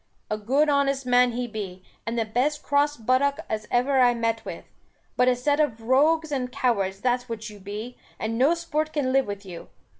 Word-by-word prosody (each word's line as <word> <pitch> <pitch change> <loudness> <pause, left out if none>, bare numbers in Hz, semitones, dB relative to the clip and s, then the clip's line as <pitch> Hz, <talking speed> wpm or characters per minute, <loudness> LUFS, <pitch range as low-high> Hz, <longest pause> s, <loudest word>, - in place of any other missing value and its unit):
A 215 - 0
good 270 +8 +2
honest 280 -2 +1
man 250 -1 +4
he 245 +1 -2
be, 195 -5 -7 0.2
and 230 +1 -2
the 225 - +1
best 275 +7 -1
cross 290 +1 +1
buttock 255 +5 +1
as 215 -1 -3
ever 265 +2 +2
I 245 -1 +5
met 230 -1 -1
with; - - -7 0.5
but 250 - +3
a 250 - +4
set 285 +4 0
of 290 -7 +1
rogues 300 +6 +3
and 255 -3 -2
cowards 195 -7 0
that's 245 0 0
what 220 -1 -5
you 205 - -13
be; 210 +5 -7 0.2
and 220 +1 -3
no 275 +8 +4
sport 310 -2 -2
can 260 -4 0
live 270 -3 +3
with 200 0 -6
you. 175 -3 -9
250 Hz, 205 wpm, -25 LUFS, 220-280 Hz, 0.5 s, I